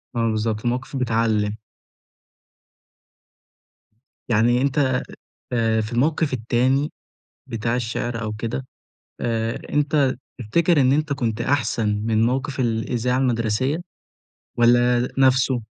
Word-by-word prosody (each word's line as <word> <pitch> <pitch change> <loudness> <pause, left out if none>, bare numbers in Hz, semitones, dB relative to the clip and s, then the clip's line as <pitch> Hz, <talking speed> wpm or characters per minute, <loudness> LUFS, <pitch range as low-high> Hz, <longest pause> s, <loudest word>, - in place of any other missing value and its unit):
آه، 115 -1 +1
بالضبط، 110 0 -1
المواقف 125 +3 -2
بتعلِّم. 110 -4 0 2.7
يعني 120 +2 +3
أنت، 135 -2 +1 0.5
آآ، 115 -2 +2
في 110 +2 -4
الموقف 150 +4 +1
التاني 130 +4 +1 0.6
بتاع 115 +1 -2
الشعر 120 -1 -3
أو 105 -1 -3
كده، 115 +4 -4 0.5
آآ، 115 -1 -1
أنت 145 -2 +2 0.2
تفتكر 155 +7 +2
إن 130 - +4
أنت 150 +1 +1
كنت 120 -5 -2
أحسن 120 -4 0 0.2
من 110 0 +2
موقف 130 +2 -1
الإذاعة 120 +1 0
المدرسية، 125 +2 0 0.8
والّا 120 +1 +4
نفسه؟ 130 -2 +3
120 Hz, 105 wpm, -22 LUFS, 115-130 Hz, 2.7 s, إن